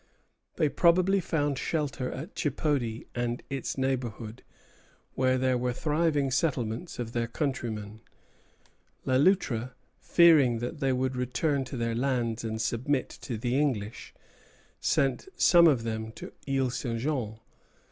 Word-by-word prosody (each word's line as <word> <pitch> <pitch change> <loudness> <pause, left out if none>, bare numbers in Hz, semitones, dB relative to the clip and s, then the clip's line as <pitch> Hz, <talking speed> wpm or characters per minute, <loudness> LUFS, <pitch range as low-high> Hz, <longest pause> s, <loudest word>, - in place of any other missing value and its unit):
They 155 - +2
probably 185 +5 +3
found 145 -6 -1
shelter 145 -5 -2
at 155 +10 -7
Chipody 140 -6 -1
and 120 0 -2
its 135 -1 -3
neighborhood, 125 -4 -3 0.7
where 130 0 +2
there 130 -1 +1
were 125 0 -1
thriving 150 -1 +1
settlements 130 0 -1
of 120 -2 -4
their 115 -1 -1
countrymen. 115 -6 -3 1.0
Le 130 0 +3
Loutre, 130 - +2 0.3
fearing 155 -9 +5
that 125 +7 -5
they 135 -2 +1
would 130 0 0
return 130 +3 0
to 130 - -6
their 115 -1 -1
lands 120 -2 -1
and 110 -1 -3
submit 125 +5 0
to 120 - -6
the 120 +3 -1
English, 115 -7 -2 0.7
sent 135 - +1
some 170 -1 +7
of 130 -7 +3
them 110 -1 -3
to - - -9 0.2
Isle 135 -2 +1
St. 120 -2 -3
Jean. 120 -5 -2
130 Hz, 135 wpm, -28 LUFS, 115-145 Hz, 1.0 s, some